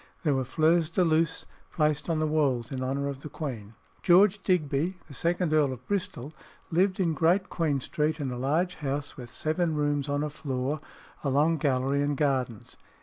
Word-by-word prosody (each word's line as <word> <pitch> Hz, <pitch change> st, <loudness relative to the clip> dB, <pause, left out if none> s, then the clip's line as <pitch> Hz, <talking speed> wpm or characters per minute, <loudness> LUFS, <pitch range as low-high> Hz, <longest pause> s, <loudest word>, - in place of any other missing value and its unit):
There 150 Hz, -4 st, +2 dB
were 130 Hz, -1 st, 0 dB
fleurs 160 Hz, +4 st, +2 dB
de 180 Hz, +2 st, +2 dB
luce 165 Hz, -1 st, +1 dB, 0.3 s
placed 150 Hz, -1 st, 0 dB
on 165 Hz, -, +1 dB
the 155 Hz, -, +1 dB
walls 140 Hz, -7 st, +1 dB
in 130 Hz, -1 st, -3 dB
honour 135 Hz, +2 st, -1 dB
of 140 Hz, -1 st, -5 dB
the 150 Hz, -, -7 dB
queen. 115 Hz, -10 st, -6 dB, 0.3 s
George 190 Hz, +3 st, +5 dB
Digby, 170 Hz, 0 st, 0 dB
the 145 Hz, -, -12 dB
second 170 Hz, +1 st, 0 dB
Earl 150 Hz, -3 st, +3 dB
of 125 Hz, -1 st, -8 dB
Bristol, 160 Hz, -8 st, -3 dB, 0.4 s
lived 185 Hz, +3 st, +2 dB
in 170 Hz, -4 st, +2 dB
Great 175 Hz, +5 st, +2 dB
Queen 155 Hz, -5 st, 0 dB
Street, 150 Hz, +4 st, -1 dB
in 135 Hz, -3 st, -2 dB
a 125 Hz, -, -4 dB
large 160 Hz, +7 st, 0 dB
house 145 Hz, -1 st, -3 dB
with 125 Hz, -4 st, -9 dB
seven 160 Hz, +1 st, -1 dB
rooms 145 Hz, -1 st, 0 dB
on 145 Hz, +1 st, 0 dB
a 150 Hz, -, -3 dB
floor, 135 Hz, 0 st, -3 dB, 0.4 s
a 140 Hz, -, 0 dB
long 150 Hz, +5 st, +3 dB
gallery, 135 Hz, -1 st, +1 dB
and 145 Hz, 0 st, 0 dB
gardens. 130 Hz, -6 st, -1 dB
150 Hz, 190 wpm, -28 LUFS, 135-165 Hz, 0.4 s, George